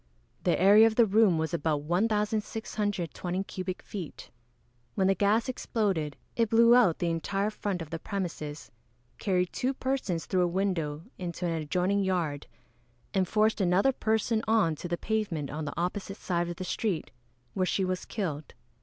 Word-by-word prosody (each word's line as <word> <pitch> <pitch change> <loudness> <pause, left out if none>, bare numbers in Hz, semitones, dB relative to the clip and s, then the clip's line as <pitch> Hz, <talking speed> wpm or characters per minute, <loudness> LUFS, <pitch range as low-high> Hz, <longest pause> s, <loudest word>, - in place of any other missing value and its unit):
The 175 - +2
area 205 +4 +7
of 220 - -1
the 235 - +6
room 205 -4 +4
was 160 0 -2
about 155 -3 0
1,620 205 -1 -1
cubic 185 -1 -5
feet. 185 -7 -8 0.6
When 195 - +2
the 195 - +4
gas 210 +5 +2
exploded, 195 - -1 0.2
it 230 -2 +2
blew 230 +1 +6
out 230 -10 +5
the 170 -1 0
entire 195 +5 -1
front 200 -5 -3
of 155 - -13
the 165 - -3
premises, 165 -6 -5 0.5
carried 180 -3 0
two 260 +2 -1
persons 260 -12 -2
through 185 - +1
a 175 - +3
window 170 -5 -1 0.2
into 175 -1 -4
an 170 - 0
adjoining 180 +6 0
yard, 170 -7 -1 0.7
and 190 -2 +2
forced 215 +1 +2
another 190 +8 +3
person 220 -1 0
on 215 -7 +3
to 175 - -5
the 175 0 -2
pavement 200 -11 -2
on 150 +2 -4
the 145 - -5
opposite 195 +3 -3
side 175 -1 -1
of 175 - -4
the 185 - -5
street, 185 -2 -2 0.4
where 185 -1 0
she 190 - +1
was 185 0 -2
killed. 155 - -4
185 Hz, 165 wpm, -29 LUFS, 170-215 Hz, 0.7 s, area